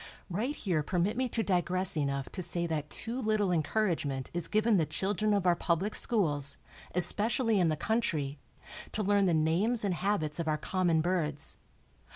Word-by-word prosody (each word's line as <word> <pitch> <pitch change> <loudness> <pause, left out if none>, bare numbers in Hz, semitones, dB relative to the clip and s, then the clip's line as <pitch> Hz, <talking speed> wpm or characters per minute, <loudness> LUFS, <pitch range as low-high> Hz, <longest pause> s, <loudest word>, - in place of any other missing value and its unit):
Right 235 +11 -2
here 175 -6 -1
permit 180 +7 0
me 255 0 -1
to 225 -1 -1
digress 185 -1 +2
enough 140 -3 -1
to 185 - -5
say 175 0 -1
that 155 -3 -3
too 240 +3 -3
little 215 -4 +1
encouragement 155 -5 -1
is 175 -1 -1
given 215 0 +2
the 160 - +2
children 205 +6 0
of 200 -3 +1
our 175 -1 +4
public 175 +5 -1
schools, 150 - +1 0.4
especially 220 +4 +2
in 175 - +3
the 155 - -1
country, 155 -10 -1 0.5
to 215 - -1
learn 200 0 +3
the 170 - +2
names 185 +9 +1
and 195 - +1
habits 175 -5 -1
of 165 - -2
our 155 -1 +1
common 170 0 +1
birds. 155 -4 -1
180 Hz, 175 wpm, -30 LUFS, 155-210 Hz, 0.5 s, our